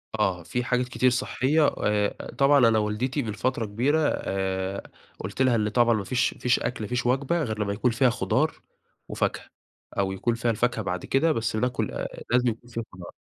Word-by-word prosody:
آه. 95 -5 0
في 125 +8 -2
حاجات 125 0 0
كتير 125 +1 +2
صحّية، 130 +4 +1
و 145 - 0
آآ 105 -1 0
طبعًا 140 -2 +5
أنا 110 -1 +3
والدتي 110 +7 -1
من 110 -3 -4
فترة 120 0 -1
كبيرة 125 +10 +1 0.2
آآ، 95 0 -3 0.3
قُلت 100 +7 -4
لها 130 -2 +4
إن 105 -2 +1
طبعًا 120 +1 +3
ما 105 -3 -1
فيش 125 +6 0
ما - - -19
فيش 125 0 +2
أكل، 120 - -3
ما 105 - -3
فيش 125 0 -2
وجبة، 140 +7 +1
غير 110 -4 -3
لما 100 -1 0
يكون 120 +4 +1
فيها 125 +2 +3
خضار، 120 - 0 0.5
وفاكهة. - - -2 0.5
أو 95 -1 +1
يكون 115 +5 -1
فيها 115 0 0
الفاكهة 115 0 0
بعد 90 -2 -3
كده، 160 +4 +2
بس 115 -5 -1
ناكل 125 +3 -1
آآ - - -6
لازم 125 0 +3
يكون 120 +1 -7
فيه 115 -1 -4
الخضار. 90 -5 -11
120 Hz, 205 wpm, -26 LUFS, 105-125 Hz, 0.5 s, طبعًا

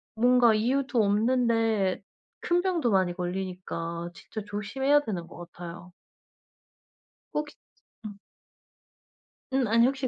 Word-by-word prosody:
뭔가 245 0 +5
이유도 250 +2 +1
없는데 225 -2 +2 0.4
큰 350 0 +2
병도 340 -10 +1
많이 185 -3 +2
걸리니까 175 -2 -4
진짜 215 - -8
조심해야 260 +8 +1
되는 185 -11 -4
것 - - -13
같아요. 175 +1 -9 1.4
혹시 300 0 -3 0.5
음. 205 - -7 1.4
음 265 -2 +2
아니 230 +2 +5
혹시 270 0 0
220 Hz, 220 characters per minute, -27 LUFS, 185-255 Hz, 1.4 s, 뭔가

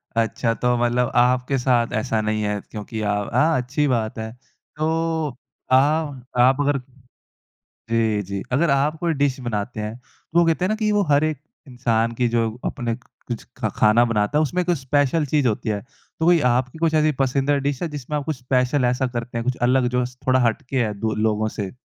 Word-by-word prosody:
अच्छा, 115 +1 +1
तो 125 +1 +1
मतलब 120 +1 +1
आपके 125 +2 +3
साथ 125 -2 +1
ऐसा 110 -2 -1
नहीं 110 0 -1
है। 105 0 -1
क्योंकि 105 +2 -7
अ, 105 - -1
अ, 105 +10 +1
अच्छी 135 +4 0
बात 115 -4 -1
है। 110 0 -5 0.4
तो 155 +1 0 0.8
आ 130 - +7 0.6
आप 130 +2 +5
अगर 145 -1 +1 1.1
जी, 110 -2 +1
जी। 100 +1 -5
अगर 150 +6 +2
आप 145 +3 +1
कोई 170 -1 0
डिश 140 -2 0
बनाते 110 -2 -3
हैं, 105 +2 -4
तो 125 +6 -4
वो 170 - +5
कहते 165 +2 +1
है - - 0
ना 215 - +1
कि 215 -1 0
वो 205 -1 +3
हर 145 +1 +4
एक 155 -3 -1 0.3
इंसान 115 -2 0
की 125 - +3
जो 115 -1 +2 0.2
अपने 120 -4 -2
कुछ 120 -1 -9
ख 110 -4 -1
खाना 110 +2 +5
बनाता 115 +4 0
है - - +4
उसमें 175 +4 0
कुछ 175 -2 +1
स्पेशल 145 +3 +1
चीज़ 145 -1 +1
होती 110 0 -1
है। 105 -1 -1
तो 150 +4 -8
कोई 175 0 +5
आपकी 125 +4 0
कुछ 165 -1 +1
ऐसी 155 0 +3
पसंदीदा 135 +2 +1
डिश 140 +2 -4
है 170 - 0
जिसमें 150 0 -4
आप 145 - -4
कुछ 155 0 -2
स्पेशल 125 +1 +1
ऐसा 125 +2 +1
करते 120 0 -4
हैं 115 - -2
कुछ 130 - 0
अलग 130 -1 +3
जो 125 - +2
स 125 0 -10
थोड़ा 130 0 +4
हट 115 +6 -1
के 130 -3 +1
है 105 -2 -2
दो 110 0 -1
लोगों 110 0 0
से? 100 +2 -4
125 Hz, 210 wpm, -22 LUFS, 115-145 Hz, 1.1 s, आ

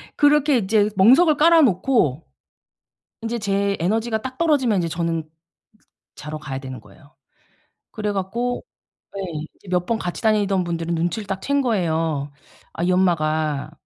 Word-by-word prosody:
그렇게 290 -2 +4
이제 210 0 +2
멍석을 275 - +5
깔아 330 +1 +6
놓고 185 - +1 1.0
인제 230 +1 -3
제 200 -1 0
에너지가 220 +4 0
딱 260 0 -7
떨어지면 275 - +2
이제 170 -1 -1
저는 165 -1 -2
쓰 155 - -26 0.9
자러 155 +1 -7
가야 135 -3 -6
되는 130 -3 -8
거예요. 110 +8 -20 0.8
그래 210 -2 -3
갖고 235 +6 -2 0.5
예 - - -3 0.3
이제 200 - -22
몇 180 -1 0
번 230 - 0
같이 175 - -5
다니던 205 -4 +2
분들은 170 0 -3
눈치를 175 +5 -2
딱 195 -1 -3
챈 280 0 +1
거예요. 160 - -1 0.4
'아 170 - -4
이 180 - +2
엄마가 155 -5 0
190 Hz, 295 characters per minute, -22 LUFS, 165-230 Hz, 1.0 s, 깔아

